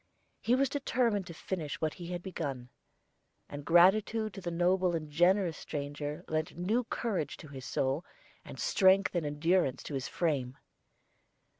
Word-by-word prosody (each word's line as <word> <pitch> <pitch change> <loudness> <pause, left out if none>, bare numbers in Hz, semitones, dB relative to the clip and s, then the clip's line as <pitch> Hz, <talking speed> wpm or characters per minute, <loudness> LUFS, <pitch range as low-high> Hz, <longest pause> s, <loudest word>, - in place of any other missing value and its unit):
He 240 - +2
was 275 +1 +3
determined 235 -8 0
to 170 - -7
finish 160 -5 -4
what 155 -1 -1
he 175 -2 -8
had 175 0 -5
begun; 140 -9 -4 0.8
and 145 0 -7
gratitude 200 +6 +4
to 195 - -8
the 175 - -3
noble 180 +1 +2
and 155 -2 -5
generous 175 +1 +3
stranger 145 0 -5
lent 155 +1 -2
new 215 +8 0
courage 195 - -2
to 155 - -12
his 135 -2 -8
soul, 135 +5 0 0.4
and - - -10
strength 195 - +4
and 170 -4 0
endurance 150 -1 +1
to - - -7
his 135 -1 -2
frame. 135 -7 -1
175 Hz, 155 wpm, -31 LUFS, 150-195 Hz, 0.8 s, gratitude